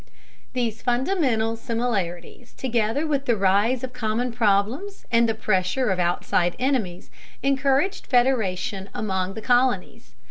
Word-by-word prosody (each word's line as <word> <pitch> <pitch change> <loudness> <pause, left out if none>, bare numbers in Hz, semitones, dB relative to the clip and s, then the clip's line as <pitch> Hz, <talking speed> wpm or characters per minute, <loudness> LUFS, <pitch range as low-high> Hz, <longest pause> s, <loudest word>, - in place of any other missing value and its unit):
These 235 -4 -2
fundamental 245 - +1
similarities, 225 -3 -3
together 240 +3 -1
with 285 -3 -1
the 240 - +2
rise 205 +6 +2
of 255 -1 -5
common 240 +1 -1
problems 230 - 0
and 230 -1 +4
the 225 - 0
pressure 210 +3 0
of 185 - -1
outside 175 0 +1
enemies, 235 -10 -1 0.3
encouraged 275 +6 +1
federation 210 -6 +1
among 190 -2 -2
the 220 - -7
colonies. 245 -5 0
230 Hz, 120 wpm, -24 LUFS, 200-260 Hz, 0.3 s, and